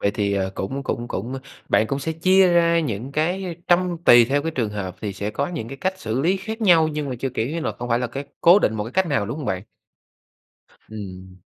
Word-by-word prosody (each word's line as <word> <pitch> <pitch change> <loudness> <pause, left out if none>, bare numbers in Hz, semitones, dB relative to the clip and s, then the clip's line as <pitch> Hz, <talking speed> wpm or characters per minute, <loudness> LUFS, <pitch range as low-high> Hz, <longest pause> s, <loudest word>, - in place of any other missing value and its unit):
Vậy 100 - +2
thì, 100 -1 -1
ờ, 95 -1 0
cũng 135 +8 -4
cũng 120 -2 -3
cũng 120 +7 -4 0.3
bạn 110 - +3
cũng 140 - -2
sẽ 160 +4 -3
chia 185 +3 +4
ra 170 -1 +4
những 125 -1 -4
cái, 175 +6 0
ơ, 180 - -4 0.2
trăm 175 0 +3
tùy 120 -1 +8
theo 140 +4 0
cái 165 - -2
trường 120 -9 -2
hợp, 95 -3 -5
thì 105 -2 -3
sẽ 100 +2 -4
có 140 +6 -2
những 155 -10 -5
cái 135 - -7
cách 190 +6 -2
xử 110 +3 -2
lý 180 +7 +2
khác 220 +4 -6
nhau 170 -6 +5
nhưng 150 -2 -3
mà 130 - -3
chưa, 135 - -1
kiểu 120 -3 -2
như 165 +2 -3
là, 110 -7 -2
không 120 +4 -7
phải 115 0 +2
là 125 - -1
cái 140 +4 -6 0.2
cố 175 +4 +7
định 110 - +1
một 105 - -2
cái 115 - -8
cách 190 -1 +2
nào, 110 -9 0
đúng 120 +7 -4
hông 145 - -5
bạn? 95 0 -2 1.3
Ừm. 95 -3 -9
135 Hz, 260 wpm, -22 LUFS, 110-170 Hz, 1.3 s, tùy